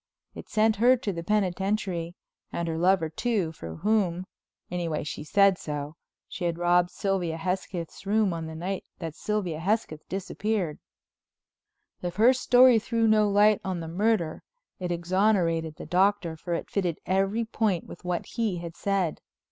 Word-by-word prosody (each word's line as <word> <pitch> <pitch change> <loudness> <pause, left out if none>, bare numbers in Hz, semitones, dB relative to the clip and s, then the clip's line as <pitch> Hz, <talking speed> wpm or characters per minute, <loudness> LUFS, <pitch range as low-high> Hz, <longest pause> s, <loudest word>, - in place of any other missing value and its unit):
It - - -10
sent 220 0 +2
her 250 +4 +5
to 220 -5 -3
the 170 - -4
penitentiary, 190 -2 -1 0.4
and 170 - -2
her 160 0 -2
lover, 180 -1 +3
too, 190 0 -1
for 80 - -8
whom—anyway 180 -4 -2
she 150 - -5
said 195 +3 +4
so—she 150 +4 -7
had 170 -1 0
robbed 175 0 +3
Sylvia's 180 -5 -2
Hesketh's 180 -2 -3
room 210 -2 +2
on 165 -1 -4
the 160 - -7
night 185 +4 -3
that 165 -3 -5
Sylvia 185 -5 -2
Hesketh 180 -4 -2
disappeared. 195 -2 -2 1.2
If 175 -1 -4
her 230 +6 +6
story 250 -2 +6
threw 230 0 0
no 215 -1 +4
light 205 +1 +4
on 185 -2 -2
the 165 - -5
murder 180 -2 0 0.4
it 180 -1 -3
exonerated 170 -2 +1
the - - -9
Doctor, 185 -2 +2
for 170 +2 -3
it - - -4
fitted 180 -5 0
at 190 - +1
every 205 +4 0
point 215 -6 0
with - - -11
what 180 -1 -2
he 220 -6 -2
had 170 -1 -7
said. 195 -5 -1
185 Hz, 155 wpm, -27 LUFS, 170-210 Hz, 1.2 s, her